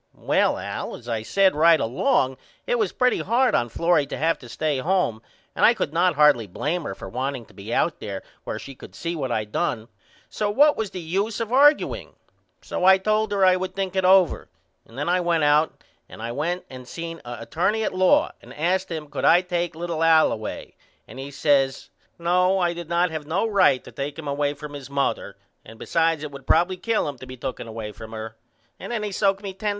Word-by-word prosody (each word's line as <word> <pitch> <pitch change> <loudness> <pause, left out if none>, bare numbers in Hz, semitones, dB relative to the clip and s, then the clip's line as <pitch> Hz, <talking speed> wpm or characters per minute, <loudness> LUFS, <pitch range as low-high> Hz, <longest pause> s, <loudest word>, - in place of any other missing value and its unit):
Well - - +1
Al - - -5
as 120 - -13
I 115 -2 -2
said 190 - +3
right 165 +1 +5
along 130 - +1 0.3
it - - 0
was 430 - +1
pretty 250 0 +1
hard 250 +3 +2
on 120 - +1
Florrie 165 +3 +2
to - - -5
have 165 +2 +1
to 120 - -12
stay 150 +2 -1
home 160 - 0 0.3
and - - -1
I 235 - +7
could 170 -8 -3
not 175 0 +2
hardly 145 -7 +4
blame 150 - -3
her - - -4
for - - -9
wanting 130 0 -4
to - - -21
be 100 +2 -9
out 165 +6 +1
there 100 -2 -6 0.2
where - - -4
she 135 - -9
could - - -13
see 170 0 -4
what 135 -5 -3
I 110 -2 -1
done 110 +2 -2 0.4
so 210 -1 -2
what 290 +8 +5
was 220 -2 -3
the 185 - -7
use 195 +6 -2
of 230 -2 -3
argueing? 285 +4 +3 0.5
So - - -4
I 190 +1 +7
told 215 +2 0
her 200 -2 +3
I 185 0 +6
would 185 0 -4
think 195 -1 -3
it 190 - +1
over 185 -1 +4 0.4
and 115 - -15
then 145 - -2
I 180 +1 +2
went 170 -3 +1
out 150 +2 +2 0.3
and - - -12
I 115 +1 -4
went 170 +8 -2
and 130 -1 -11
seen 165 +3 -7
a 120 0 -7
attorney 185 - 0
at - - -1
law 185 - +3
and - - -13
asked 180 +5 0
him 160 -3 -4
could 145 - -6
I 175 - +6
take 175 -2 -2
little 165 -1 -3
Al 160 -1 +5
away 110 -1 -6 0.3
and 130 - -11
he 135 +1 -6
says 140 -2 +1 0.3
No 180 +2 +2
I 175 -2 +1
did 170 -1 -8
not 170 0 +2
have 155 -2 -5
no 185 +8 0
right 195 - +3
to - - -12
take 140 0 -5
him 160 -2 -7
away 145 +1 -1
from 150 0 -9
his 140 -2 -8
mother 140 0 -2 0.3
and 110 +1 -13
besides 165 +3 0
it 150 - -5
would 140 -1 -11
probily 175 +3 +3
kill 230 -7 0
him 140 -3 -6
to 130 - -10
be 130 - -9
tooken 125 -1 -5
away 110 -1 -6
from 110 +2 -11
her 110 0 -7 0.4
and - - -7
then 225 -3 -2
he 210 - -3
soaked 195 +1 +1
me 195 -1 -5
$10. 210 +3 -3
165 Hz, 230 wpm, -24 LUFS, 135-190 Hz, 0.5 s, I